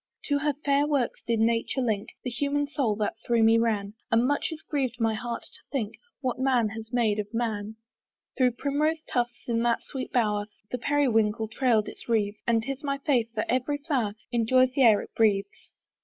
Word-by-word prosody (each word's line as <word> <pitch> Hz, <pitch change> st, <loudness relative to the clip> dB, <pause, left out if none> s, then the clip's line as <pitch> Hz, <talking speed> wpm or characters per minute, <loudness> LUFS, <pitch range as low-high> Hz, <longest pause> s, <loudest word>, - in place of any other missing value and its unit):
To 285 Hz, -1 st, +1 dB
her 295 Hz, 0 st, +1 dB
fair 285 Hz, +1 st, +3 dB
works 280 Hz, -5 st, 0 dB
did 230 Hz, -1 st, +1 dB
nature 230 Hz, +3 st, +1 dB
link 220 Hz, -5 st, -1 dB
The 250 Hz, -, -3 dB
human 285 Hz, +4 st, 0 dB
soul 275 Hz, -7 st, 0 dB
that 210 Hz, +1 st, -2 dB
through 235 Hz, -1 st, +2 dB
me 225 Hz, +1 st, +6 dB
ran; 210 Hz, -3 st, 0 dB, 0.2 s
And 230 Hz, +1 st, +3 dB
much 290 Hz, +2 st, +1 dB
it 320 Hz, -, -6 dB
griev'd 260 Hz, -5 st, -1 dB
my 225 Hz, -1 st, +2 dB
heart 235 Hz, +2 st, -4 dB
to -, -, -11 dB
think 225 Hz, -6 st, -2 dB, 0.3 s
What 255 Hz, -2 st, -2 dB
man 255 Hz, -4 st, +2 dB
has 220 Hz, +1 st, -8 dB
made 225 Hz, -4 st, +2 dB
of 205 Hz, 0 st, -4 dB
man. 220 Hz, -2 st, -2 dB, 0.6 s
Through 250 Hz, -2 st, +3 dB
primrose 300 Hz, +5 st, 0 dB
tufts, 240 Hz, -1 st, -2 dB
in 230 Hz, -1 st, +1 dB
that 235 Hz, 0 st, +1 dB
sweet 265 Hz, -2 st, -6 dB
bower, 210 Hz, -4 st, +1 dB, 0.2 s
The 250 Hz, -, -2 dB
periwinkle 225 Hz, -6 st, +1 dB
trail'd 225 Hz, -2 st, +2 dB
its -, -, -10 dB
wreathes; 210 Hz, -2 st, +1 dB
And 230 Hz, -1 st, +3 dB
'tis 275 Hz, +3 st, -5 dB
my 275 Hz, -1 st, -1 dB
faith 265 Hz, -5 st, +1 dB
that 215 Hz, -, 0 dB
every 260 Hz, +4 st, 0 dB
flower 270 Hz, -9 st, -1 dB, 0.2 s
Enjoys 255 Hz, +2 st, +3 dB
the 270 Hz, -, +1 dB
air 220 Hz, -5 st, +6 dB
it -, -, -13 dB
breathes. 205 Hz, -3 st, +1 dB
240 Hz, 195 wpm, -27 LUFS, 220-270 Hz, 0.6 s, me